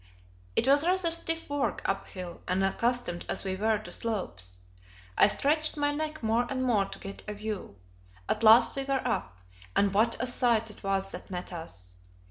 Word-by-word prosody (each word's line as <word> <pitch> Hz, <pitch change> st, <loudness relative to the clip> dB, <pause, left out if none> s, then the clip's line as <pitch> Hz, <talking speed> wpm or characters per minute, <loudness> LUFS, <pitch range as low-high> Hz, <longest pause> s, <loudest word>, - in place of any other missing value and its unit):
It -, -, +2 dB
was 285 Hz, +2 st, +5 dB
rather 360 Hz, -1 st, +2 dB
stiff 330 Hz, 0 st, -1 dB
work 285 Hz, -1 st, -1 dB
uphill, 185 Hz, -2 st, -4 dB
unaccustomed 195 Hz, +1 st, 0 dB
as -, -, -1 dB
we 190 Hz, -1 st, -2 dB
were 215 Hz, +2 st, +2 dB
to 215 Hz, -, -10 dB
slopes. 180 Hz, -, -3 dB, 0.6 s
I -, -, +6 dB
stretched 305 Hz, +7 st, +1 dB
my 290 Hz, 0 st, +2 dB
neck 310 Hz, -1 st, -3 dB
more 230 Hz, +2 st, +2 dB
and 260 Hz, -1 st, -1 dB
more 220 Hz, -6 st, +3 dB
to -, -, -9 dB
get 195 Hz, 0 st, -8 dB
a 210 Hz, -, -4 dB
view. 210 Hz, -, -5 dB, 0.5 s
At 215 Hz, -, 0 dB
last 225 Hz, +2 st, +7 dB
we 275 Hz, -, -1 dB
were 270 Hz, -2 st, -1 dB
up; 100 Hz, -, -2 dB, 0.4 s
and 200 Hz, -1 st, +3 dB
what 225 Hz, +3 st, +3 dB
a 250 Hz, -, 0 dB
sight 235 Hz, -3 st, +2 dB
it -, -, -15 dB
was 195 Hz, -1 st, -1 dB
that -, -, -9 dB
met 180 Hz, 0 st, -5 dB
us! 90 Hz, -, -9 dB
220 Hz, 180 wpm, -29 LUFS, 195-270 Hz, 0.6 s, last